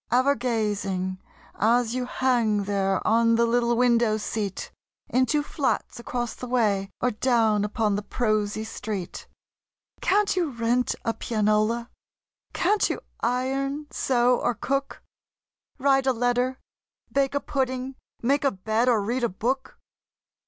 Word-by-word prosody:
Ever 260 Hz, +3 st, +4 dB
gazing, 205 Hz, -6 st, -2 dB, 0.3 s
as 230 Hz, +2 st, +2 dB
you 250 Hz, 0 st, -2 dB
hang 235 Hz, -6 st, +1 dB
there 195 Hz, -1 st, 0 dB
on 230 Hz, +1 st, +4 dB
the 235 Hz, +1 st, +3 dB
little 235 Hz, 0 st, +2 dB
window 235 Hz, -3 st, +3 dB
seat, 210 Hz, -2 st, -4 dB, 0.4 s
Into 260 Hz, +4 st, +2 dB
flats 285 Hz, -4 st, -2 dB
across 240 Hz, 0 st, -3 dB
the 250 Hz, -, -8 dB
way 210 Hz, -6 st, +1 dB
or 250 Hz, -, +1 dB
down 220 Hz, -2 st, +2 dB
upon 210 Hz, 0 st, 0 dB
the 205 Hz, -, -1 dB
prosy 215 Hz, -1 st, -1 dB
street, 205 Hz, -4 st, -6 dB, 0.7 s
Can't 405 Hz, 0 st, +2 dB
you 350 Hz, -4 st, +1 dB
rent 240 Hz, 0 st, 0 dB
a 230 Hz, -, +1 dB
pianola? 215 Hz, +2 st, 0 dB, 0.6 s
Can't 405 Hz, +4 st, +2 dB
you -, -, -3 dB, 0.2 s
iron, 270 Hz, +4 st, -1 dB
sew, 245 Hz, -1 st, +2 dB
or 240 Hz, -, 0 dB
cook? 275 Hz, +5 st, -3 dB, 0.7 s
Write 270 Hz, -1 st, +2 dB
a 260 Hz, -, +4 dB
letter, 245 Hz, +2 st, 0 dB, 0.5 s
bake 275 Hz, 0 st, +1 dB
a -, -, +3 dB
pudding, 260 Hz, -1 st, -2 dB, 0.3 s
make 280 Hz, +4 st, +2 dB
a 275 Hz, -, +4 dB
bed 220 Hz, +4 st, 0 dB
or 225 Hz, -4 st, +3 dB
read 240 Hz, +4 st, -1 dB
a 235 Hz, -, +2 dB
book? 260 Hz, +8 st, -3 dB
240 Hz, 135 wpm, -25 LUFS, 215-260 Hz, 0.7 s, Ever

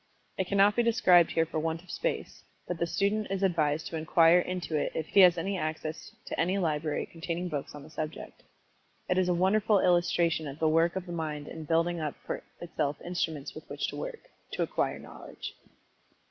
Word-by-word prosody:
It 190 Hz, -, -2 dB
cannot 200 Hz, +1 st, +4 dB
be 240 Hz, -, +3 dB
described 185 Hz, -7 st, +5 dB
here 165 Hz, -, +3 dB
for 160 Hz, -, -3 dB
want 160 Hz, +1 st, -2 dB
of 185 Hz, -, -11 dB
space, -, -, -3 dB, 0.2 s
but 175 Hz, -2 st, -3 dB
the 170 Hz, -, +1 dB
student 200 Hz, +3 st, 0 dB
is 195 Hz, 0 st, -2 dB
advised 160 Hz, -4 st, +1 dB
to 165 Hz, -, -4 dB
inquire 165 Hz, +2 st, +5 dB
into 180 Hz, -3 st, -3 dB
it 150 Hz, -, 0 dB
if 160 Hz, -, -2 dB
he 200 Hz, -, +2 dB
has 180 Hz, -2 st, +8 dB
access 160 Hz, -3 st, -3 dB
to -, -, -5 dB
any 180 Hz, +4 st, +2 dB
library 155 Hz, -4 st, -1 dB
containing 170 Hz, +2 st, -4 dB
books 145 Hz, -2 st, -4 dB
on 145 Hz, -, -9 dB
the 155 Hz, -, -13 dB
subject. 155 Hz, 0 st, -6 dB, 0.7 s
It 180 Hz, -, +2 dB
is 180 Hz, -1 st, +2 dB
a 175 Hz, -, +2 dB
wonderful 205 Hz, +3 st, +3 dB
illustration 175 Hz, -3 st, +2 dB
of 140 Hz, 0 st, -7 dB
the 160 Hz, -, +1 dB
work 165 Hz, +3 st, +3 dB
of 190 Hz, -1 st, -3 dB
the 175 Hz, -, -8 dB
mind 155 Hz, -3 st, -4 dB
in 160 Hz, -1 st, -7 dB
building 165 Hz, +2 st, +1 dB
up 150 Hz, -2 st, -3 dB
for -, -, -3 dB, 0.2 s
itself 150 Hz, -4 st, -2 dB
instruments 160 Hz, -5 st, -3 dB
with -, -, -11 dB
which -, -, -2 dB
to -, -, -7 dB
work -, -, -5 dB, 0.3 s
to -, -, 0 dB
acquire -, -, -1 dB
knowledge. -, -, -9 dB
170 Hz, 200 wpm, -29 LUFS, 155-185 Hz, 0.7 s, has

